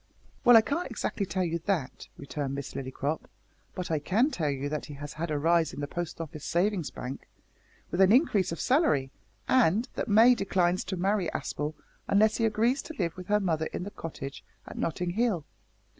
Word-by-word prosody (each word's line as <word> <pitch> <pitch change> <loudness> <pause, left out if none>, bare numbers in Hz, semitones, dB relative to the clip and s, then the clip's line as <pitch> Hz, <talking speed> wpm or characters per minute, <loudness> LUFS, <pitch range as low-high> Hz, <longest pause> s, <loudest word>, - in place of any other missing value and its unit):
"Well, 245 -3 +9
I - - +8
can't 290 +7 -2
exactly 205 -4 -2
tell 185 0 -1
you 170 -1 -1
that," 180 -10 -2
returned 140 -1 -4
Miss 140 -1 -6
Lillycrop, 135 +3 -3 0.5
"but 180 -2 -4
I 155 - +1
can 220 - +2
tell 155 - -1
you 140 0 -2
that 150 +1 -4
he 145 - -8
has 145 +1 -7
had 165 +2 -4
a 150 - 0
rise 165 +2 +2
in - - -7
the 145 - -2
Post 175 +2 -5
Office 155 -2 -7
Savings 180 -1 0
Bank, 130 +2 -7 0.6
with 175 - +1
an 190 +1 +6
increase 215 - +3
of 165 - -4
salary, 255 - +2 0.4
and 235 -1 +3
that - - -3
May 225 +4 +7
declines 185 -5 +1
to 190 -1 -3
marry 190 -1 +1
Aspel 150 +1 -3 0.3
unless 215 +2 +4
he 225 - +2
agrees 230 +5 +2
to 320 - -9
live 170 -4 -1
with 180 -1 -9
her 210 0 +3
mother 160 -5 0
in - - -5
the 205 - -6
cottage 140 -6 -7 0.2
at - - -9
Nottinghill. 180 +1 -1
175 Hz, 195 wpm, -28 LUFS, 155-210 Hz, 0.6 s, Well